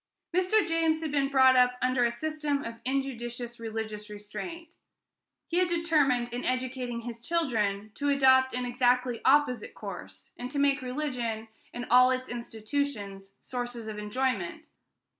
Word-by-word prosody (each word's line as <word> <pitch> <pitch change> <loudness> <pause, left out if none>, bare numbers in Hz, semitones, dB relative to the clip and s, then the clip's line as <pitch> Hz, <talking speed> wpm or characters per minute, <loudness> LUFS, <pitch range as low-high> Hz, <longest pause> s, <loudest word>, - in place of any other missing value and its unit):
Mr. 370 +2 +3
James 330 -1 +2
had 315 -2 -3
been 280 -1 +1
brought 260 -1 +6
up 250 0 +4
under 255 -1 +2
a 235 - +3
system 300 +2 -2
of 230 0 -7
injudicious 240 -3 -3
religious 220 -2 -5
restraint. 330 - -7 0.7
He 345 - -1
had 365 - +3
determined, 295 -8 +2
in 245 - -3
educating 255 -2 -2
his 235 0 -7
children, 220 -10 0
to 285 +4 -1
adopt 260 -2 +5
an 250 0 -1
exactly 245 0 +1
opposite 265 -4 +3
course, - - -9
and 245 +1 -4
to 285 - -5
make 280 0 +3
religion 250 -5 -3 0.2
and 245 0 -5
all 250 +1 +7
its 255 0 -1
institutions 220 -4 -4
sources 245 -2 -5
of 215 -1 -5
enjoyment. 265 - -2
255 Hz, 145 wpm, -29 LUFS, 235-285 Hz, 0.7 s, all